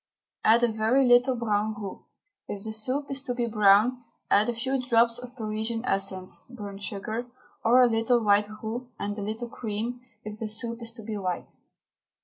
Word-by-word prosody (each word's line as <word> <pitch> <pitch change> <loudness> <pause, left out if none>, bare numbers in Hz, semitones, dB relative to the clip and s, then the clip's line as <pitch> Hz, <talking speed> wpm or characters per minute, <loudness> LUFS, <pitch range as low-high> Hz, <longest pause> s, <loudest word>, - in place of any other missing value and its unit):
Add 230 +2 +5
a 240 - +4
very 225 +5 +3
little 245 +1 +5
brown 215 -2 0
roux, 200 -3 -7 0.4
if 200 -1 -5
the 220 - -3
soup 260 +6 -1
is 275 0 -1
to 250 -3 -3
be 240 -1 0
brown, 215 +3 +4 0.3
and 210 +3 +5
a - - 0
few 260 +3 -1
drops 235 -1 +3
of 250 0 -10
Parisian 220 +1 -3
essence 190 -4 -1
(burnt 205 -5 -8
sugar), 220 +3 -4 0.4
or 250 +3 +6
a - - +6
little 230 +1 +2
white 205 0 +4
roux 240 +3 -4
and 205 0 -3
a 210 - -5
little 220 +4 -3
cream 230 +2 -4 0.2
if 215 -1 -7
the 225 - -2
soup 230 +2 -4
is 230 0 -3
to 225 -2 -9
be 215 0 -4
white. 185 -3 -3
225 Hz, 185 wpm, -27 LUFS, 210-245 Hz, 0.4 s, or